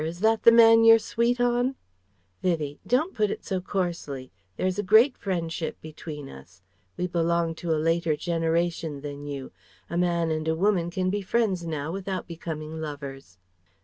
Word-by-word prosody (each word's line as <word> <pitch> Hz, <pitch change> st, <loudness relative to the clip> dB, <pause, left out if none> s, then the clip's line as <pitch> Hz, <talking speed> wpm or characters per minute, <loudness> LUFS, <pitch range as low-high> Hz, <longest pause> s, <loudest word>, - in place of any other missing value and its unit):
Is 165 Hz, +3 st, -5 dB
that 220 Hz, 0 st, +3 dB
the 230 Hz, -, +8 dB
man 225 Hz, -1 st, +7 dB
you're 225 Hz, 0 st, +9 dB
sweet 235 Hz, +2 st, 0 dB
on?" 245 Hz, +2 st, +1 dB, 0.7 s
Vivie: 155 Hz, -5 st, -1 dB
"Don't 310 Hz, +10 st, +1 dB
put 215 Hz, -3 st, +1 dB
it -, -, -5 dB
so 190 Hz, -2 st, -2 dB
coarsely. 170 Hz, -9 st, -3 dB, 0.3 s
There -, -, -1 dB
is 185 Hz, +1 st, 0 dB
a -, -, +3 dB
great 220 Hz, +7 st, +5 dB
friendship 170 Hz, -4 st, -3 dB
between 155 Hz, -2 st, -8 dB
us. 85 Hz, -, -14 dB, 0.4 s
We 180 Hz, -, -1 dB
belong 170 Hz, -1 st, 0 dB
to 175 Hz, -, -4 dB
a 160 Hz, -, +2 dB
later 165 Hz, 0 st, +1 dB
generation 165 Hz, -2 st, -1 dB
than 145 Hz, 0 st, -7 dB
you. 140 Hz, -2 st, -6 dB, 0.4 s
A 170 Hz, -, 0 dB
man 170 Hz, -2 st, +1 dB
and 155 Hz, 0 st, -2 dB
a 160 Hz, -, +1 dB
woman 180 Hz, -1 st, +1 dB
can 185 Hz, +1 st, -1 dB
be 205 Hz, +1 st, -1 dB
friends 190 Hz, -4 st, 0 dB
now 155 Hz, -1 st, -3 dB
without 190 Hz, 0 st, -4 dB
becoming 160 Hz, -2 st, -6 dB
lovers." 140 Hz, -, -7 dB
170 Hz, 175 wpm, -26 LUFS, 155-200 Hz, 0.7 s, you're